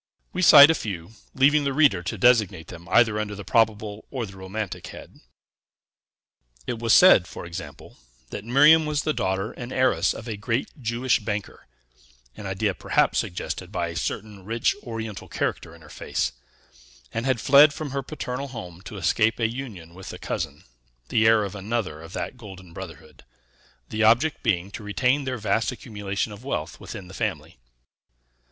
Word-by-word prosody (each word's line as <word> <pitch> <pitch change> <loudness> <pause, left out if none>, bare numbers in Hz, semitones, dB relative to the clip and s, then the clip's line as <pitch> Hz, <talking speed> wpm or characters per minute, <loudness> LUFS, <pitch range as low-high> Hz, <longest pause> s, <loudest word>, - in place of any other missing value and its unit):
We 185 - -2
cite 150 -3 +10
a - - +3
few, 100 - -5 0.2
leaving 145 +3 +4
the 140 -1 -1
reader 140 - +4
to 90 - -4
designate 105 -10 +3
them 85 0 -11
either 110 -3 +4
under 105 -1 -3
the 100 - -8
probable 110 -2 +1
or 130 -4 -3
the 95 -2 -12
romantic 95 +2 -5
head. - - -12 1.5
It 115 - -4
was 115 -1 0
said, 120 - +7
for - - -8
example, 85 -7 -9 0.3
that 100 - -6
Miriam 150 +7 +5
was 150 -1 -1
the 155 - 0
daughter 95 0 -1
and 120 0 -8
heiress 130 -10 +2
of 115 - -9
a 110 -3 -4
great 115 +5 -2
Jewish 120 +2 +1
banker 105 - -5 0.7
(an 100 - -7
idea 95 +2 -1
perhaps - - +1
suggested 90 +1 -4
by 85 -3 -2
a 85 - -8
certain 105 +2 -4
rich 115 +4 0
Oriental 115 -3 -6
character 80 - -3
in 85 - -18
her - - -15
face), 60 -3 -2 0.8
and 115 +3 -2
had 130 -3 +1
fled 140 +5 +7
from 150 -1 -6
her 140 0 -2
paternal 135 -1 -5
home 90 -9 -9
to 105 - -8
escape 105 +6 +1
a 115 - +2
union 110 -9 -8
with 95 +1 -9
a - - -8
cousin, - - -5 0.5
the 110 -1 +3
heir 110 -1 +5
of 100 - -5
another 100 -5 -3
of 80 +2 -11
that - - -5
golden 95 -6 -12
brotherhood; - - -11 0.7
the 110 - -2
object 120 +8 +3
being 95 -4 0
to 110 - -7
retain 125 +7 +1
their 130 -1 -2
vast 110 -1 0
accumulation 105 -2 -4
of 105 +4 -12
wealth 135 - -4
within 95 - -8
the 95 - -12
family. - - -4
110 Hz, 175 wpm, -24 LUFS, 95-125 Hz, 1.5 s, cite